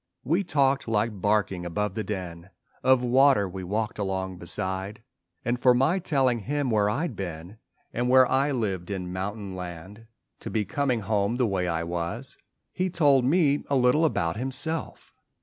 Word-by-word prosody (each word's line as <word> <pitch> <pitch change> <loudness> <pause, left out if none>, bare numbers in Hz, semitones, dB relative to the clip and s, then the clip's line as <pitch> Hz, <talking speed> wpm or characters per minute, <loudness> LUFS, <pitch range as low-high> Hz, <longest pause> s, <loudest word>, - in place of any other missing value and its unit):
We 170 +9 +1
talked 140 -6 +1
like 105 -2 -1
barking 105 -3 +1
above 105 +4 -2
the 110 +1 -3
din 90 -3 -6 0.3
Of 130 -1 +4
water 130 -3 +4
we 95 0 -7
walked 105 +4 -2
along 95 -2 -3
beside. 95 +4 -2 0.4
And 120 +1 0
for 125 0 +5
my 140 +9 +2
telling 135 -8 +1
him 140 +3 -2
where 105 -2 +2
I'd 135 +4 -2
been 90 +2 -7 0.3
And 120 +1 -1
where 130 0 +7
I 135 +3 +1
lived 100 -9 -2
in 90 -2 -4
mountain 100 +1 -4
land 95 +5 -8 0.3
To - - -6
be 110 -2 -1
coming 125 +2 0
home 100 +2 0
the 125 - +2
way 95 -4 -1
I 85 -1 -1
was, 85 +9 -4 0.3
He 185 0 -1
told 145 -7 +3
me 145 -1 +3
a 140 - +2
little 130 +4 +3
about 85 - 0
himself. 135 +6 -4
110 Hz, 165 wpm, -26 LUFS, 95-130 Hz, 0.4 s, where